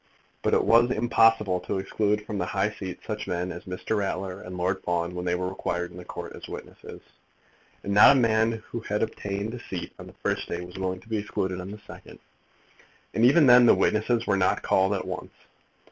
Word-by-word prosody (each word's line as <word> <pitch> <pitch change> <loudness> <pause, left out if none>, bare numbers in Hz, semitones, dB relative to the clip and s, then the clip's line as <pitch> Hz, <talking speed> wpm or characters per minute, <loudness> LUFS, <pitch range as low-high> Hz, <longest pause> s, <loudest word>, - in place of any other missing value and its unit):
But - - +2
it - - +2
was 120 +2 +5
impossible 115 -5 +3
to 90 +2 -3
exclude 105 +2 -1
from 105 -3 -4
the 90 - -1
high 100 +2 0
seat 95 -3 -7
such 105 -1 -4
men 90 +1 -2
as 85 - -9
Mr. 90 +4 -3
Ratler 95 -2 -3
and 90 0 -8
Lord 90 +2 -1
Fawn 85 0 -1
when 90 0 -5
they 90 0 +1
were 90 +1 -2
required 90 -2 -3
in - - -12
the 90 - -8
Court - - -7
as - - -10
witnesses; - - -10 0.8
and 100 - -2
not 105 +7 +8
a - - +3
man 110 -1 +2
who 115 - -3
had 105 -1 -2
obtained 100 0 -4
a 125 - -6
seat 95 -6 -6
on - - -9
the - - -13
first - - -1
day 85 - -3
was 90 +2 -10
willing 95 -1 -3
to 95 - -20
be 110 -1 -1
excluded 95 -3 -3
on 90 - -8
the 105 - -7
second. - - -12 1.0
And 110 - +1
even 145 +6 +6
then 125 -1 +8
the - - +7
witnesses 115 +2 +1
were 95 - +1
not 95 -1 +1
called 95 +2 +2
at 95 - -4
once. - - -6
100 Hz, 220 wpm, -26 LUFS, 90-110 Hz, 1.0 s, not